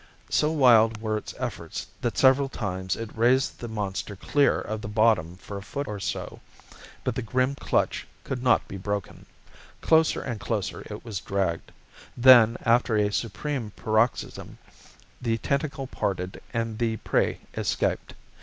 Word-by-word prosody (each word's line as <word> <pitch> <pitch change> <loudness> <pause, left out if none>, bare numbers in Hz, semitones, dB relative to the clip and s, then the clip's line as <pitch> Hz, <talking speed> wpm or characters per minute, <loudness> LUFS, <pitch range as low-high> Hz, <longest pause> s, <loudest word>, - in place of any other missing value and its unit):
So 150 - +3
wild 115 -7 +5
were 110 -1 -1
its 105 - -5
efforts - - -5 0.2
that - - -2
several 135 +1 +5
times 95 -6 -3
it 115 -1 -7
raised 125 +4 +2
the 120 - -5
monster 105 -2 -4
clear 140 +9 +2
of 110 0 -4
the - - -6
bottom 105 -6 +2
for 100 +1 -8
a - - -6
foot 135 +8 -5
or 105 -3 -5
so. - - -4 0.6
But 125 - -1
the 125 - -3
grim 130 +3 0
clutch 140 - -1 0.2
could 130 -2 -4
not 125 - +3
be 100 - -7
broken. 100 0 -4 0.5
Closer 160 0 +3
and 120 -5 -4
closer 100 -4 -3
it 105 +2 -8
was 105 -5 -4
dragged. 95 -4 -2 0.5
Then, 120 -2 +7
after 115 -1 +3
a 105 -1 +2
supreme 115 +1 -3
paroxysm, 110 +1 -1 0.6
the 115 -2 0
tentacle 140 +3 -2
parted 95 -7 -3
and 115 -2 -2
the 115 -2 0
prey - - 0
escaped. - - -1
115 Hz, 155 wpm, -26 LUFS, 105-125 Hz, 0.6 s, Then